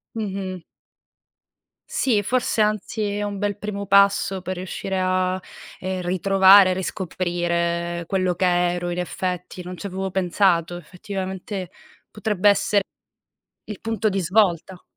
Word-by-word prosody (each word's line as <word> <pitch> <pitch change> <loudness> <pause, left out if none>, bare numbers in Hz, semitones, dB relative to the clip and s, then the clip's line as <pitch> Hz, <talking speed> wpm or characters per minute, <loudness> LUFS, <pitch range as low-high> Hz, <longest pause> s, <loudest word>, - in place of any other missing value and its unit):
Mh-mh. 195 -4 -4 1.3
Sì, 220 -6 +1
forse 240 +1 0
anzi 215 +1 0
è 210 - -2
un 205 -1 -4
bel 205 0 -2
primo 200 -1 -5
passo 200 -1 +3
per 185 0 -4
riuscire 190 +1 -4
a, 185 0 0 0.4
ehm, 185 0 -3
ritrovare, 190 +1 +6
riscoprire 175 -2 -2
quello 185 -1 0
che 180 - -1
ero 175 0 +1
in 175 - -4
effetti. 180 0 -4
Non 180 +1 -6
c'avevo 190 0 -4
pensato. 175 -2 +1
Effettivamente 190 +1 -6 0.4
potrebbe 210 -1 +1
essere 200 0 +3 0.8
il 210 - -8
punto 225 -1 -1
di 195 -1 -1
svolta. 185 -1 +1
185 Hz, 120 wpm, -23 LUFS, 180-200 Hz, 1.3 s, ritrovare